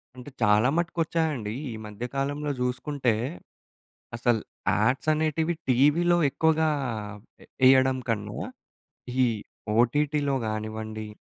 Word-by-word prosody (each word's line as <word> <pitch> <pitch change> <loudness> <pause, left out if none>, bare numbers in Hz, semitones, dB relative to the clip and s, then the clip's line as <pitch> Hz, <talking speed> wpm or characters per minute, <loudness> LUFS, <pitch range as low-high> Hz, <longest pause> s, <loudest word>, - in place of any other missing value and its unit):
అంటే 125 +2 -10
చాలా 105 +2 +4
మటుకు 170 0 -1
వచ్చాయండీ. 155 -10 -1 0.2
ఈ - - -5
మధ్య 105 +3 -6
కాలంలో 145 +2 -1
జూసుకుంటే, 125 0 0 1.0
అసలు 120 -1 +1 0.3
యాడ్స్ 125 +8 +1
అనేటివి 160 +2 0 0.2
టీవీలో 150 +7 +4
ఎక్కువగా 160 +2 +2 0.7
ఎ - - -16 0.2
ఎయ్యడం 130 0 +5
కన్నా, 105 -2 -2 0.9
ఈ - - +6 0.5
ఓటీటీలో 145 +3 +2
గానివ్వండి, 110 0 -4
130 Hz, 100 wpm, -26 LUFS, 110-150 Hz, 1.0 s, ఈ